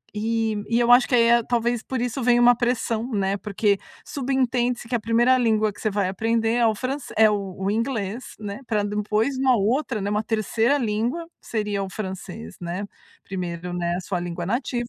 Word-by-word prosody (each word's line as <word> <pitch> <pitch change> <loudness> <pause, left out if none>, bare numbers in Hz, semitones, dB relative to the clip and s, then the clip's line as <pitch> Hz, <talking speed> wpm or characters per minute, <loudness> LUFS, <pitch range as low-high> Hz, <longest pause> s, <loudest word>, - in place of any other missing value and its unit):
e 220 -1 -1
e 235 +1 +2
eu 240 0 +4
acho 245 +1 +7
que - - -4
aí, 230 -1 +5
eh, 235 -1 +5
talvez 240 -1 0
por 260 -2 -3
isso 245 +1 -2
venha 240 0 +4
uma 245 0 +7
pressão, 240 0 -1
né, 200 -1 0
porque 200 0 0 0.3
subentende-se 250 -3 -1
que 245 - -1
a - - +1
1ª 240 +4 +3
língua 220 -3 +2
que - - -16
você 215 - +1
vai 200 -2 0
aprender 225 +3 0
é 240 -1 +3
o 220 - +2
franc 270 +5 -3 0.2
é 220 -1 +7
o 200 -3 -2
o 195 +1 -1
inglês, 225 0 -2
né, 205 +4 -6
pra 215 -3 0
depois 210 +5 0
uma 260 -2 +4
outra, 235 +3 0
né, 200 - -2
uma 210 +1 0
3ª 225 +5 +1
língua, 240 +8 -1
seria 210 -3 -2
o 190 - -5
francês, 185 - -7
né. 175 +4 -4 0.4
Primeiro, 180 -2 -5
né, 175 0 -1
a - - -3
sua 180 0 -3
língua 175 0 -4
nativa. 240 +2 -2
225 Hz, 200 wpm, -24 LUFS, 200-240 Hz, 0.4 s, acho